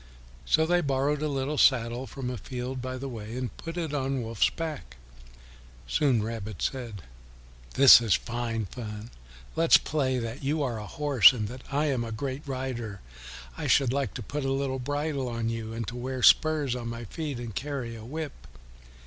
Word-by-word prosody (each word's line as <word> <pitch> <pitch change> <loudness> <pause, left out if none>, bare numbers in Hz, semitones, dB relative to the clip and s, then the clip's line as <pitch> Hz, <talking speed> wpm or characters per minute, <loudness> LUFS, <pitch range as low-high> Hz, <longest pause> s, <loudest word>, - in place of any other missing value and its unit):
So 160 - +3
they 175 +2 +3
borrowed 140 0 0
a 155 - 0
little 140 +1 -1
saddle 120 0 +3
from 125 +2 -5
a 125 - -4
field 125 +3 -5
by 130 0 -4
the 135 +2 -5
way 115 -2 -6
and 125 -1 -4
put 165 +1 -7
it 160 -4 -2
on 135 -2 -1
Wolf's 115 -2 +2
back. 150 - -6 0.9
Soon 120 - +2
Rabbit 110 -3 -5
said, 115 -8 -3 0.7
"This 135 -2 +10
is 110 -5 +3
fine 115 -2 -3
fun; 105 +1 -7 0.4
let 165 0 +1
us - - +12
play 130 -4 -1
that 115 +3 -5
you 150 +2 0
are 120 -5 -2
a 105 - -7
horse 145 - +6
and 110 -4 -3
that 125 +2 -8
I 145 +2 +1
am 135 -5 0
a 115 - -5
great 130 +4 -4
rider. 125 -6 -4 0.5
I - - -4
should 130 -2 +4
like 140 -1 -1
to 120 - -5
put 145 +6 -4
a 135 - 0
little 135 -1 -1
bridle 145 0 -2
on 115 -1 -2
you, 115 -1 -4
and 115 -1 -4
to 120 - -8
wear 130 +1 -4
spurs 150 -5 +5
on 120 -2 -5
my 115 0 -5
feet 145 +4 -4
and 120 -4 -7
to - - -1
carry 135 -5 -4
a 110 - -9
whip." 150 +4 -5
130 Hz, 195 wpm, -28 LUFS, 115-140 Hz, 0.9 s, us